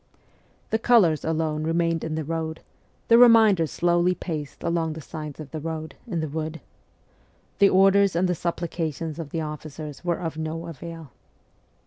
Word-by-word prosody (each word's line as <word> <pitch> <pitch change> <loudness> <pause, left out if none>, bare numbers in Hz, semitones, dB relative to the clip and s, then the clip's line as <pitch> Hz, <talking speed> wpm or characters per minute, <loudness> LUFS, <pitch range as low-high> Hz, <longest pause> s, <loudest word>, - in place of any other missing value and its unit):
The 220 - +2
colours 210 -10 +4
alone 160 -1 -1
remained 165 0 0
in 160 -1 -3
the 160 - -2
road; 160 +1 -4 0.5
the 230 0 +7
remainder 220 -8 +6
slowly 175 +3 +2
paced 155 -6 -6
along 165 -2 0
the 160 - -8
sides 150 +1 -8
of 150 -3 -9
the 155 - -4
road, 160 0 -5
in 175 -7 -2
the 155 - -2
wood. 155 +2 -4 1.0
The 200 -1 +7
orders 195 0 +4
and 180 +2 +2
the 180 - +1
supplications 165 -2 -3
of 160 -3 -5
the 160 - -3
officers 150 0 -7
were 175 -1 0
of 160 -2 -4
no 160 +1 -4
avail. 165 -2 -9
165 Hz, 160 wpm, -25 LUFS, 155-175 Hz, 1.0 s, the